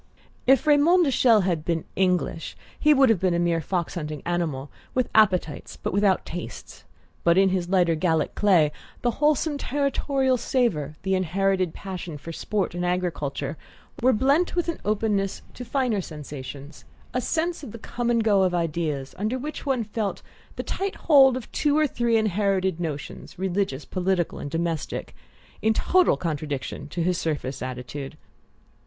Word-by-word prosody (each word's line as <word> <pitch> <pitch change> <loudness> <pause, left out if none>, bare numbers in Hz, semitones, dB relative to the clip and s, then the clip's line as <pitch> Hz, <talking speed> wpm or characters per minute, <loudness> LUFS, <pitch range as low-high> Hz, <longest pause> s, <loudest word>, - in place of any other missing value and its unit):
If 270 +3 +5
Raymond 310 +5 +5
de 275 - +1
Chelles 230 -5 +5
had 170 -4 0
been 165 -1 -1
English 180 -3 0 0.2
he 300 - +4
would 270 -3 +6
have 220 -5 +3
been 185 -1 +1
a - - +1
mere 170 -1 +1
fox 175 +1 -2
hunting 150 -4 -5
animal, 160 -6 -2 0.2
with 255 -2 0
appetites 185 -8 +2
but - - -4
without 200 -1 +2
tastes; 175 +1 -8 0.4
but 170 +1 +4
in 195 0 +5
his 180 -2 -1
lighter 180 -3 +3
Gallic 160 -1 +1
clay 175 -8 +4 0.3
the 240 - +3
wholesome 295 0 +2
territorial 275 -1 +1
savour, 195 - 0
the 190 0 0
inherited 185 0 +1
passion 180 -5 -6
for 165 +4 -8
sport 195 +2 -2
and 175 0 -3
agriculture, 160 -5 -2 0.4
were 255 +2 +5
blent 275 +11 +2
with 350 -1 0
an 335 - -3
openness 205 -2 0
to 250 - -7
finer 250 -5 0
sensations, 145 -2 -8 0.3
a 250 - 0
sense 335 +5 -1
of 275 - -8
the 230 - -8
come 235 +2 -3
and 230 -1 +2
go 205 -3 +4
of 185 -1 +2
ideas, 155 -5 -2
under 215 +5 -1
which 295 +3 -6
one 260 -4 +1
felt 205 -3 -3 0.3
the - - -4
tight 390 0 -3
hold 270 -5 +5
of 250 - -9
two 295 0 +1
or 310 - +4
three 235 -4 +1
inherited 195 -4 +1
notions, 150 -5 -6
religious, 185 -6 -1
political, 185 -2 -1
and 145 - -5
domestic, 165 -1 -3 0.5
in 220 +1 +3
total 365 +8 +3
contradiction 145 -3 -4
to 170 +3 -3
his 180 0 +1
surface 140 -4 -3
attitude. 130 +3 -6
190 Hz, 165 wpm, -25 LUFS, 165-240 Hz, 0.5 s, would